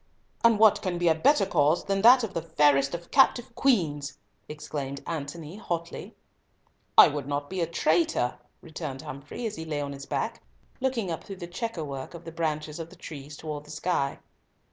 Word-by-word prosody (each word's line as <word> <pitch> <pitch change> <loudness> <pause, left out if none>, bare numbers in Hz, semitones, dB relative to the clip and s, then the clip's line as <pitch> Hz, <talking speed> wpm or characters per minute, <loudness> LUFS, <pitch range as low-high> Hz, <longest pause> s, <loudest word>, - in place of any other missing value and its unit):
"And 230 -2 +6
what 210 -1 +5
can 180 -3 -2
be 175 -1 +3
a - - +6
better 195 - +3
cause 155 -2 +2
than 195 0 0
that 245 +3 +8
of 210 -3 -3
the 165 - -2
fairest 145 -3 +3
of 170 0 -9
captive 250 -3 +4
queens?" 150 - +1 0.3
exclaimed 145 -2 -5
Antony, 160 +2 -5
hotly. 170 -6 -5 0.8
"I - - +11
would 145 -2 -4
not 145 +1 -3
be 190 -2 -2
a 165 - +1
traitor," 160 -6 +1 0.2
returned 140 -5 -6
Humfrey, 140 - -7
as 215 - -3
he 160 - -5
lay 155 -2 -3
on 140 -1 -3
his 140 0 -9
back, - - -2 0.4
looking 245 -8 -1
up 165 - -4
through 195 - -8
the 180 -2 -7
chequerwork 170 - -5
of 170 - -10
the 165 - -7
branches 155 -1 -3
of 165 0 -6
the 185 - -14
trees 145 -4 -9
towards 150 -2 -6
the 150 - -11
sky. 150 -3 -1
160 Hz, 190 wpm, -27 LUFS, 145-185 Hz, 0.8 s, I